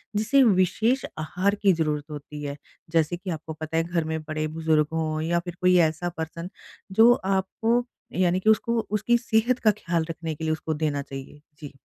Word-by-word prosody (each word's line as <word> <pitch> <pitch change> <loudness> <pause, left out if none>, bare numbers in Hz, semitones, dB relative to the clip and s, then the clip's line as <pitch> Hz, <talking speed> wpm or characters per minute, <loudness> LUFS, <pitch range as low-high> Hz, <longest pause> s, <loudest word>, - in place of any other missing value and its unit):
जिसे 220 +7 +3
विशेष 220 +5 +2 0.2
आहार 185 +6 0
की 200 -1 +3
ज़रूरत 150 -3 -1
होती 150 0 -8
है? 140 0 -4 0.4
जैसे 165 +1 +1
कि 185 +1 -8
आपको 160 0 -5
पता 155 +1 -4
है 165 - +3
घर 170 -1 -1
में 160 0 -2
बड़े-बुज़ुर्ग 155 0 0
हो 155 -1 -1
या 170 +2 +1
फिर 175 -1 -6
कोई 180 0 +5
ऐसा 160 +3 -3
पर्सन 165 +2 -5 0.4
जो 225 +4 +7
आपको 195 +4 0 0.4
यानी 180 0 +3
कि 215 +3 +2
उसको 235 +2 +2
उसकी 215 +3 +2
सेहत 235 +1 +1
का 215 - +4
ख़्याल 170 -5 -2
रखने 160 -1 -4
के 160 - -8
लिए 155 0 +1
उसको 160 0 -3
देना 150 -2 -1
चाहिए, 135 +1 -9 0.2
जी। 145 -2 -9
170 Hz, 185 wpm, -25 LUFS, 155-200 Hz, 0.4 s, जो